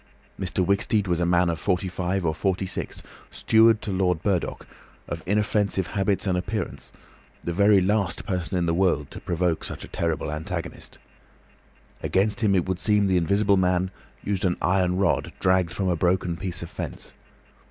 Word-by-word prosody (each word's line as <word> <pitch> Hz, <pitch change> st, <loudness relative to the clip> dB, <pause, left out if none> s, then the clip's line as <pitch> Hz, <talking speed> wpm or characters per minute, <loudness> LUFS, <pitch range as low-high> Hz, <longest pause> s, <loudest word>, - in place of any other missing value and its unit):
Mr. 95 Hz, -1 st, 0 dB
Wicksteed 100 Hz, +2 st, +2 dB
was 85 Hz, -2 st, 0 dB
a 85 Hz, -, +1 dB
man 90 Hz, 0 st, +3 dB
of 85 Hz, -1 st, -1 dB
forty 95 Hz, -1 st, 0 dB
five 90 Hz, 0 st, -2 dB
or 80 Hz, -, +1 dB
forty 95 Hz, +3 st, -1 dB
six, -, -, -5 dB, 0.3 s
steward 110 Hz, 0 st, +4 dB
to 105 Hz, -, -3 dB
Lord 90 Hz, -3 st, 0 dB
Burdock, 95 Hz, -4 st, -1 dB, 0.4 s
of -, -, -5 dB
inoffensive 105 Hz, -2 st, +1 dB
habits 100 Hz, +3 st, 0 dB
and 95 Hz, -2 st, +1 dB
appearance, 100 Hz, +4 st, -4 dB, 0.5 s
the 85 Hz, -, -2 dB
very 100 Hz, +2 st, +5 dB
last 95 Hz, -2 st, 0 dB
person 90 Hz, 0 st, -2 dB
in 85 Hz, -, +1 dB
the 85 Hz, -, +1 dB
world 85 Hz, -6 st, +1 dB
to -, -, -7 dB
provoke 85 Hz, -1 st, -1 dB
such -, -, -6 dB
a -, -, -8 dB
terrible 80 Hz, -4 st, -2 dB
antagonist. 75 Hz, +1 st, -6 dB, 1.0 s
Against 105 Hz, +5 st, +1 dB
him 100 Hz, -3 st, +3 dB
it 90 Hz, -2 st, +1 dB
would 95 Hz, -1 st, -2 dB
seem 105 Hz, -1 st, +3 dB
the 95 Hz, -2 st, +2 dB
Invisible 100 Hz, +4 st, +2 dB
Man 90 Hz, 0 st, +1 dB, 0.3 s
used 100 Hz, -1 st, -2 dB
an 90 Hz, -2 st, +1 dB
iron 90 Hz, -1 st, +1 dB
rod 100 Hz, -, +1 dB
dragged 95 Hz, -2 st, +2 dB
from 95 Hz, +2 st, -2 dB
a 90 Hz, -, +2 dB
broken 90 Hz, 0 st, +1 dB
piece 90 Hz, -1 st, -4 dB
of 85 Hz, -, -9 dB
fence. -, -, -6 dB
95 Hz, 175 wpm, -25 LUFS, 90-100 Hz, 1.0 s, very